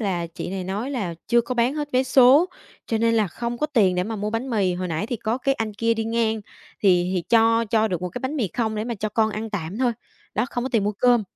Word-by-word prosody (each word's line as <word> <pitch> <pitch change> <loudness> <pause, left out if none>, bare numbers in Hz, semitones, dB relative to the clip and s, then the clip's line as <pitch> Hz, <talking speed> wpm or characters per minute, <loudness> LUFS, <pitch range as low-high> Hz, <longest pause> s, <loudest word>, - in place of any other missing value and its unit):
là 180 -5 -1
chị 165 - -7
này 190 -1 -4
nói 210 +8 -3
là 200 -11 -3
chưa 235 0 +5
có 250 +2 -4
bán 245 +4 +2
hết 295 -1 -3
vé 255 +1 +3
số, 265 +6 +6 0.4
cho 225 - 0
nên 230 0 +2
là 215 -3 +3
không 235 +6 -4
có 300 - +1
tiền 210 -11 +3
để 180 0 0
mà 220 0 -4
mua 210 +1 -2
bánh 230 +4 -3
mì, 195 -5 +1
hồi 180 0 -3
nãy 165 +6 -2
thì 240 -1 -3
có 225 +4 -2
cái 275 +1 +1
anh 220 -3 -3
kia 230 +2 +1
đi 225 0 -2
ngang, 225 -1 0 0.4
thì 180 -2 +3
thì 180 - 0
cho 230 0 +4
cho 220 0 +1
được 180 -2 -3
một 180 - -2
cái - - -7
bánh 270 +4 -3
mì 225 -9 0
không 220 +2 -2
để 215 +1 -2
mà 235 -1 -3
cho 215 +1 -3
con 220 +1 +1
ăn 215 +1 -5
tạm 190 +1 -4
thôi, 250 -2 +2 0.4
đó, 220 - +1
không 245 -1 -2
có - - -1
tiền 215 -3 +2
mua 210 - 0
cơm. 240 +1 +3
225 Hz, 285 wpm, -23 LUFS, 200-240 Hz, 0.4 s, số